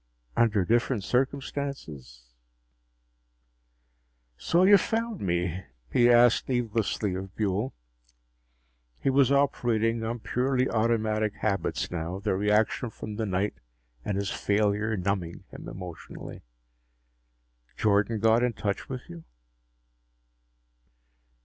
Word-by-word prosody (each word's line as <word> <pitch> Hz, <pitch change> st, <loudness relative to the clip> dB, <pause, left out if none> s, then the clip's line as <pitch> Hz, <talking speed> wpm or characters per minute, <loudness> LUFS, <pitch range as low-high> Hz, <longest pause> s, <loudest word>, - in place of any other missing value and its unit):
Under 105 Hz, -5 st, +3 dB
different 120 Hz, -1 st, +1 dB
circumstances... 125 Hz, -, -3 dB, 2.0 s
"So 170 Hz, -, +2 dB
you 200 Hz, +1 st, +7 dB
found 225 Hz, 0 st, -2 dB
me?" 90 Hz, 0 st, -1 dB, 0.3 s
he 120 Hz, 0 st, +5 dB
asked 120 Hz, +1 st, +5 dB
needlessly 115 Hz, -5 st, 0 dB
of 95 Hz, +1 st, -6 dB
Buehl. 105 Hz, +4 st, -1 dB, 1.3 s
He 135 Hz, -, 0 dB
was 135 Hz, 0 st, +4 dB
operating 115 Hz, -5 st, +1 dB
on 115 Hz, +2 st, -2 dB
purely 130 Hz, +3 st, 0 dB
automatic 110 Hz, -2 st, 0 dB
habits 100 Hz, -2 st, -1 dB
now, 85 Hz, +1 st, -3 dB
the 100 Hz, +1 st, -1 dB
reaction 105 Hz, +4 st, +1 dB
from 105 Hz, -1 st, -8 dB
the 110 Hz, -1 st, -1 dB
night 95 Hz, +2 st, 0 dB, 0.5 s
and 100 Hz, -, -2 dB
his 100 Hz, -1 st, -2 dB
failure 105 Hz, +1 st, +1 dB
numbing 90 Hz, -2 st, -2 dB
him -, -, -9 dB
emotionally. 90 Hz, -4 st, -9 dB, 1.4 s
"Jordan 105 Hz, +1 st, +2 dB
got 110 Hz, +2 st, +4 dB
in 125 Hz, -1 st, +1 dB
touch 100 Hz, -2 st, -3 dB
with 130 Hz, -2 st, -6 dB
you?" 85 Hz, -1 st, -10 dB
110 Hz, 105 wpm, -27 LUFS, 95-120 Hz, 2.0 s, you